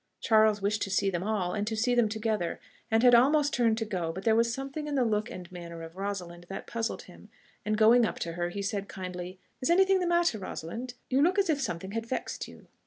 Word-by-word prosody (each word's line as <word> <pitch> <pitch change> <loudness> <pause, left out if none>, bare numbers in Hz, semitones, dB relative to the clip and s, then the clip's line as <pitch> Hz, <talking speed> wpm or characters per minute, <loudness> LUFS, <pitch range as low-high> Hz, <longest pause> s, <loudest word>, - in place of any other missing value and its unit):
Charles 215 -2 +3
wished 210 +1 0
to - - -1
see 195 0 +1
them 175 -2 -2
all, 195 -3 -1
and 205 0 -2
to 220 - -1
see 240 +3 +1
them 240 -3 +3
together, 215 -5 -2 0.3
and 225 +1 +3
had 245 -1 +7
almost 285 +5 +5
turned 230 -2 +2
to 225 - -2
go; 180 -6 -2
but 190 +4 -7
there 220 0 +4
was 230 +1 +3
something 275 +4 -5
in 290 - -2
the 255 -3 +2
look 215 0 0
and 180 0 -9
manner 170 -2 -8
of 165 +1 -10
Rosalind 180 -3 -5
that 195 - -6
puzzled 230 -1 -3
him, - - -15 0.3
and 215 0 0
going 230 +2 +6
up 225 - -1
to 170 - -2
her, 175 +1 -2
he 200 +3 -5
said 200 0 -2
kindly, 180 0 -6 0.2
"Is 255 - 0
anything 380 +2 +5
the 360 - 0
matter, 345 -9 +2
Rosalind? 230 +7 -6 0.2
You 265 +2 +3
look 360 +6 +3
as 390 -4 +3
if 290 -2 -1
something 190 -6 -4
had 225 +1 -3
vexed 255 - -4
you." - - -14
215 Hz, 245 wpm, -29 LUFS, 190-245 Hz, 0.3 s, had